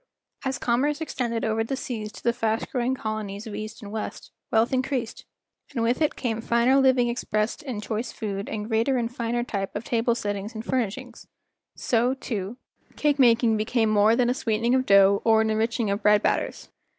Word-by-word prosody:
As 265 -1 -1
commerce 275 +5 0
extended 240 -8 -2
over 220 0 0
the 245 +4 -3
seas 220 -5 -5
to - - -12
the 235 - +2
fast 225 -1 -1
growing 250 0 0
colonies 215 -3 -4
of 220 - -7
east 215 +2 -7
and 205 - -8
west, 215 0 -6 0.2
wealth 225 +3 +2
increased, 255 -2 -2 0.5
and 230 - 0
with 240 +6 +1
it 305 - +2
came 230 -3 -2
finer 235 +3 +3
living 260 -2 +4
ex¬ 240 +1 -4
pressed 215 +6 0
in 255 -8 -5
choice 225 +3 -3
food 200 -2 -4
and 210 -1 -4
greater 230 +4 +1
and 240 0 -2
finer 240 0 -1
type 200 -5 -4
of 205 - -3
table 235 0 +1
settings 205 0 -4
and 220 +1 -6
furnishings; 250 0 -3 0.5
so, 245 +2 +1
too, 220 -4 -5 0.4
cake 290 -1 +1
making 235 -3 +4
became 220 +1 +1
more 215 +2 +4
than 245 0 +2
a 245 - +2
sweeten¬ 225 -3 -1
ing 240 - +3
of 260 0 +1
dough 200 0 +6
or 220 -1 +4
an 220 0 +1
enriching 225 0 0
of 200 - -2
bread 210 0 +4
batters. - - -1
230 Hz, 200 wpm, -25 LUFS, 215-250 Hz, 0.5 s, dough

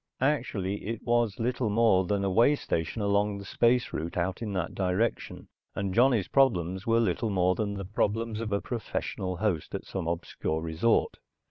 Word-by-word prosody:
Actually 105 -9 -1
it 115 0 -3
was 120 -4 +1
little 120 0 0
more 105 -3 +3
than 100 0 0
a 100 - +1
way 120 +9 +5
station 95 - -2
along 100 0 +1
the 100 - -9
space 120 +4 +2
route 80 +3 -4
out 90 +3 -1
in 110 -3 -3
that 90 -3 -2
direction, 95 +4 -1 0.3
and 100 -2 -2
Johnny's 120 -5 +3
problems 95 -8 +1
were 115 0 +4
little 110 0 0
more 90 -2 +2
than 100 0 -2
the 100 -1 -5
problems 110 +3 -1
of 110 -2 -4
a 100 - +1
professional 95 -5 -4
host 95 -6 -1
at - - -5
some 95 -4 -4
obscure 85 -2 -2
resort. 80 +8 +1
100 Hz, 175 wpm, -28 LUFS, 95-115 Hz, 0.3 s, way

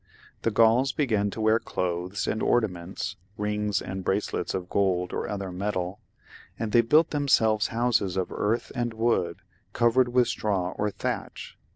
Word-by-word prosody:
The - - +1
Gfiuls 115 +4 +3
began 110 -8 +1
to 105 - -7
wear 110 +1 +3
clothes 90 +1 -3
and 110 - -1
ornaments; 95 -6 -1 0.2
rings 105 -1 -1
and 95 0 -5
bracelets 100 +3 -1
of 90 -1 -4
gold 90 -2 0
or - - -3
other 100 -2 -4
metal, 95 0 -3 0.6
and 115 -2 -3
they 120 - +6
built 150 +8 +4
them 145 -1 -1
selves 110 -4 +3
houses 115 -5 0
of 95 - -1
earth 110 +3 -1
and 120 -3 -2
wood, 110 -7 0 0.3
covered 120 +2 +3
with 125 0 +3
straw 95 -4 -1
or 105 +2 -1
thatch. - - -5
105 Hz, 160 wpm, -26 LUFS, 95-115 Hz, 0.6 s, they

